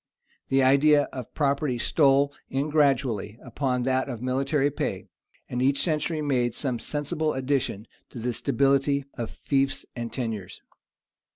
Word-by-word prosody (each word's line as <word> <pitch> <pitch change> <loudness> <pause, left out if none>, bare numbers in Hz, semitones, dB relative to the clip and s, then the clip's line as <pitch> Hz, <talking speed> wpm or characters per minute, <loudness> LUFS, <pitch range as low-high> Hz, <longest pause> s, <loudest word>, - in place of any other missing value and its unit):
[*] - - -39
The 135 0 +3
idea 145 +3 +5
of 125 -3 -7
property 140 -3 +1
stole 140 +2 +3 0.2
in 140 +3 -1
gradually 130 -8 +1
upon 125 0 -1
that 130 +1 0
of 120 -4 -5
military 135 +3 0
pay; - - -3 0.4
and 125 - -3
each 135 +2 +2
century 155 -1 -1
made 125 -5 +1
some 125 -5 -2
sensible 155 +3 -2
addition 130 -6 -1 0.2
to - - -11
the 120 +1 -2
stability 140 +3 +1
of 115 -2 -4
fiefs 135 -1 -1
and 120 -1 -4
tenures. 110 -7 -4
135 Hz, 145 wpm, -26 LUFS, 125-145 Hz, 0.4 s, idea